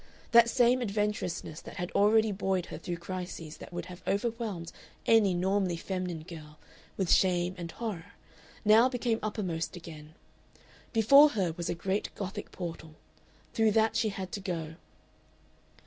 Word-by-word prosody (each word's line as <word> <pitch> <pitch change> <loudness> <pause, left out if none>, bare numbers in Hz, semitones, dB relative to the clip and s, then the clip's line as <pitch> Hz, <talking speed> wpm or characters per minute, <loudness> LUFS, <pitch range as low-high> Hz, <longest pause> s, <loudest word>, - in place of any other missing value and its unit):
That 235 0 +7
same 245 +1 +3
adventurousness 205 -7 -2
that - - -10
had 175 0 -4
already 215 +1 +4
buoyed 190 -2 -1
her - - -6
through 175 -1 -4
crises 175 -3 -6
that - - -11
would 175 0 -5
have 180 0 -10
overwhelmed 205 -5 -2 0.3
any 210 -5 +4
normally 185 -1 +1
feminine 180 -3 -4
girl 155 -3 -11 0.4
with 190 -3 0
shame 180 -1 +3
and 170 -2 -6
horror 205 -7 -6 0.5
now 220 +4 +6
became 240 -3 -1
uppermost 185 -6 -3
again. 160 -3 -11 0.8
Before 275 +7 +7
her 195 - -1
was 170 -1 -4
a - - -1
great 190 +4 -2
Gothic 195 -1 -6
portal. 165 -3 -7 0.6
Through 220 -2 +3
that 220 0 +3
she 220 - +2
had 190 -2 -6
to - - -4
go. 165 -4 -4
190 Hz, 150 wpm, -30 LUFS, 170-220 Hz, 0.8 s, That